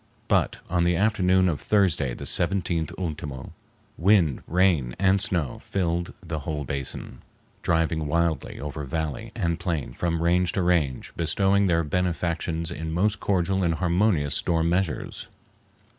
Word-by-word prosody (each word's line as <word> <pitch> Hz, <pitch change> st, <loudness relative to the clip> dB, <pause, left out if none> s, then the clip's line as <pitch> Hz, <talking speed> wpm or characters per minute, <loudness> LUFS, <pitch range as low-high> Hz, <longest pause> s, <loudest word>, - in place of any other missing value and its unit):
But -, -, +2 dB
on 85 Hz, 0 st, +1 dB
the 90 Hz, 0 st, +2 dB
afternoon 95 Hz, -2 st, +3 dB
of 80 Hz, -5 st, -1 dB
Thursday, 85 Hz, -, +2 dB
the -, -, -8 dB
17th 85 Hz, -3 st, 0 dB
ultimo, 75 Hz, -7 st, -5 dB, 0.5 s
wind, 85 Hz, -6 st, +3 dB
rain, 85 Hz, -9 st, +2 dB
and 95 Hz, +1 st, +3 dB
snow 90 Hz, -, -1 dB
filled 85 Hz, -2 st, -2 dB
the 80 Hz, -2 st, -4 dB
whole 75 Hz, 0 st, -3 dB
basin, 70 Hz, -1 st, -6 dB, 0.4 s
driving 80 Hz, -2 st, +1 dB
wildly 85 Hz, +1 st, 0 dB
over 75 Hz, +1 st, -5 dB
valley 75 Hz, 0 st, -3 dB
and 85 Hz, 0 st, -1 dB
plain 85 Hz, -6 st, -2 dB
from 85 Hz, -1 st, -1 dB
range 90 Hz, +1 st, +2 dB
to 95 Hz, -4 st, 0 dB
range, 80 Hz, -7 st, 0 dB
bestowing 95 Hz, +4 st, +2 dB
their 85 Hz, -2 st, +2 dB
benefactions 85 Hz, 0 st, -1 dB
in 80 Hz, -1 st, -4 dB
most 100 Hz, +5 st, +1 dB
cordial 95 Hz, 0 st, +1 dB
and 85 Hz, -3 st, +1 dB
harmonious 85 Hz, -3 st, +1 dB
storm 85 Hz, -1 st, +1 dB
measures. 90 Hz, -2 st, -2 dB
85 Hz, 140 wpm, -25 LUFS, 80-90 Hz, 0.5 s, afternoon